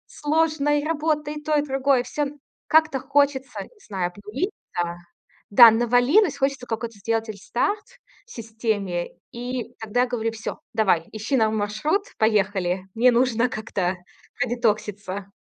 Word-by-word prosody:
сложное: 300 -1 +1
и 290 - -6
работа, 305 -1 -1
и 300 0 -5
то, 305 +1 0
и 290 - +3
другое. 270 -2 +2
Всё 290 +4 -2 0.4
как-то 315 -3 +4
хочется, 275 -1 0
не 460 - -16
знаю, 185 -4 -1
обнулиться, 205 - -4 0.5
да, 230 +3 +10
навалилось, 250 - +3
хочется 270 -2 -1
какой-то 225 -1 -4
сделать 225 +2 -1
рестарт 235 - -2 0.4
системе, 220 - -3 0.2
и 245 0 -5
тогда 220 +2 0
я 250 - +2
говорю: 225 -2 -2
"Всё, 220 -1 -6
давай 195 -7 +2
ищи 220 +6 -2
нам 220 -2 +2
маршрут, 215 - 0 0.2
поехали". 205 -3 +2
И 175 - +2
добавляю: 190 0 -12
"Мне 245 +2 +5
нужно 245 0 +2
как-то 190 -5 -2 0.4
продетокситься". 210 -5 -1
240 Hz, 140 wpm, -24 LUFS, 210-285 Hz, 0.5 s, да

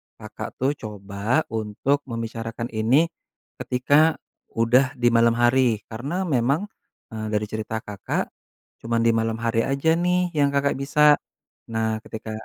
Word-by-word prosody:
Kakak - - -8
tuh 130 +2 +1
coba 105 +6 -2
untuk 110 +6 0
membicarakan 115 0 -5
ini 125 +10 +2 0.5
ketika 145 +5 +3 0.4
udah 125 +3 +3
di 120 -1 +2
malam 115 0 +4
hari. 120 -3 +3
Karena 145 +12 -3
memang, 145 - 0 0.4
eee, 110 -1 -4
dari 105 0 0
cerita 110 +1 -4
Kakak 105 -4 -3 0.5
cuman 115 0 -1
di 115 - +4
malam 115 0 0
hari 115 0 +1
aja 140 +4 +1
nih 180 0 +1
yang 145 -3 +1
Kakak 140 -1 +1
bisa. 150 +2 +4 0.5
Nah, 110 -1 -1
ketika 110 0 -7
120 Hz, 135 wpm, -24 LUFS, 110-140 Hz, 0.5 s, malam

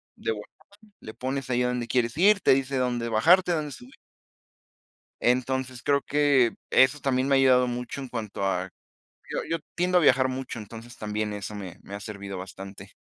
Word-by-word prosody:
de - - -2
volada, 105 -1 -6 0.5
le 110 - -9
pones 135 +2 -4
ahí 125 0 +1
a - - +1
donde 125 -1 -2
quieres 120 -2 0
ir, 200 +4 +5
te - - +5
dice 135 0 0
dónde 120 -2 -1
bajarte, 175 +12 +4
dónde 155 -3 -2
subir. 125 0 -12 1.3
Entonces 130 0 0
creo 140 0 +2
que 140 -5 +3 0.2
eso 130 +3 +5
también 130 -1 0
me 140 - +4
ha - - +5
ayudado 130 -1 +5
mucho 125 +3 -4
en 135 - -6
cuanto 110 -5 -5
a 95 -1 -1 0.6
yo - - -2
yo 165 - 0 0.2
tiendo 180 +1 +3
a - - +3
viajar 130 -4 +4
mucho, 130 -1 -5
entonces 115 +2 -10
también 105 0 -3
eso 105 0 -6
me 95 -4 -8
me 100 - -10
ha 100 - -5
servido 100 -2 -7
bastante. 95 +1 -9
125 Hz, 190 wpm, -26 LUFS, 110-135 Hz, 1.3 s, ir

